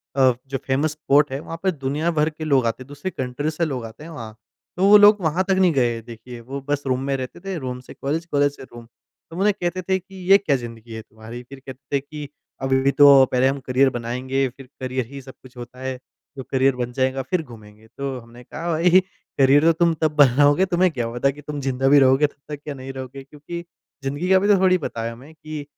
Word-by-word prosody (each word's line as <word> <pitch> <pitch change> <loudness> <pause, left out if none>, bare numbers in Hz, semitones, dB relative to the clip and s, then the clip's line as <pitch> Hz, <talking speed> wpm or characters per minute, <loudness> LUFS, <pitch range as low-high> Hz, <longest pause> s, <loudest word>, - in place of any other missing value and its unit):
अ, 130 -2 +5 0.2
जो 135 0 -3
famous 140 +4 +1
spot 150 -2 +2
है 135 - -3
वहाँ 165 +2 -7
पे 190 - +2
दुनिया 150 +2 -2
भर 155 -1 +1
के 155 0 -9
लोग 140 -5 +2
आते, 115 +2 -2
दूसरे 145 +7 -6
कंट्री 130 +2 -3
से 160 +2 -1
लोग 130 -6 -4
आते 115 +6 -11
हैं 165 - -10
वहाँ। 115 -8 -8 0.4
तो 185 - +2
वो 210 - +10
लोग 205 0 +7
वहाँ 170 +2 +1
तक - - +4
नहीं 185 -2 +4
गए 120 -4 +1
देखिए। 120 +1 -11
वो 135 +4 -7
बस 145 0 0
रूम 130 -1 +1
में 140 0 -1
रहते 130 +5 -7
थे। 195 +1 -5
रूम 130 -4 -5
से 125 - -13
कॉलेज, 155 +5 -3
कॉलेज 145 -3 +1
से - - -11
रूम। 120 -2 -12 0.4
तो 165 - -10
उन्हें 205 +2 +3
कहते 180 -1 -3
थे 190 +1 0
कि 190 +1 -17 0.2
ये 195 - +10
क्या 175 -8 0
ज़िंदगी 115 -2 -8
है 110 - -6
तुम्हारी। 110 +2 -11
फ़िर 135 +2 -12
कहते 135 +1 -7
थे - - -1
कि 145 +1 -9 0.3
अभी 135 0 +2
भी 135 +1 +3
तो 140 -2 +7
पहले 130 +1 +3
हम 135 +1 -1
करियर 130 +1 +3
बनाएँगे, 130 +3 -2
फिर 130 +1 -14
करियर 130 -1 -2
ही 140 -1 -8
सब 130 0 -12
कुछ 130 -1 -17
होता 120 +1 -10
है। 130 -1 -4 0.4
जो 130 - -5
करियर 135 0 +3
बन 125 -1 -3
जाएगा 130 +1 0
फिर 165 +7 -1
घूमेंगे। 110 -4 -15
तो 140 -1 -3
हमने 120 +1 -15
कहा 170 +7 -5
भई 175 +3 +5 0.4
करियर 140 +2 +5
तो 165 - +6
तुम 170 +1 +2
तब 155 -1 +2
बनाओगे 145 +5 +5
तुम्हें 185 -1 +2
क्या 120 -6 -3
पता 120 +3 +1
कि 145 +2 -13
तुम 145 0 -6
ज़िंदा 135 0 -1
भी 145 +1 +7
रहोगे 135 +2 +4
तब 145 +1 -13
तक 145 - -6
या 145 - -3
नहीं 135 0 -8
रहोगे। 135 +1 -8
क्योंकि 150 +5 -8 0.4
ज़िंदगी 145 +7 -3
का 190 - +6
अभी 190 +2 +3
तो 205 - +6
थोड़ी 185 -1 +4
पता 115 -8 -5
है 115 - -3
हमें 130 +7 -13
कि 155 -1 -7
135 Hz, 245 wpm, -22 LUFS, 130-155 Hz, 0.4 s, वो